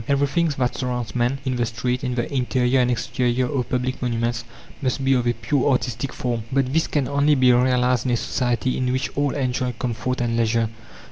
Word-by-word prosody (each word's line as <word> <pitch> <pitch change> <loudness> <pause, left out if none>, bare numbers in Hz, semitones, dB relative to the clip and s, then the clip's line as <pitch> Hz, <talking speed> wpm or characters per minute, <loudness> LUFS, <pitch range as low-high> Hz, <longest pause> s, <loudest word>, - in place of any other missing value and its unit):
Everything 140 +4 +2
that 125 -2 0
surrounds 125 -2 -3
man, 125 +2 +1
in 130 -1 -1
the 120 - +1
street, 125 +3 -2
in 125 -2 -1
the 120 +3 -2
interior 130 0 +2
and 125 -1 +3
exterior 125 +1 0
of 130 -4 -2
public 130 0 -1
monuments, 120 -1 -1 0.4
must 135 0 -1
be 135 - +4
of 125 -2 +1
a 120 - +3
pure 125 +5 0
artistic 125 0 -1
form. 120 -2 -2
But 135 -1 +1
this 160 +1 +2
can 145 -3 0
only 145 +1 +3
be 130 -2 +5
realized 125 0 +2
in - - +1
a - - +2
society 120 +1 -1
in 125 -1 0
which 130 +1 -2
all 145 -1 0
enjoy 130 -2 -1
comfort 125 +2 -3
and 120 -1 0
leisure. 115 -1 +1
125 Hz, 205 wpm, -23 LUFS, 120-130 Hz, 0.4 s, be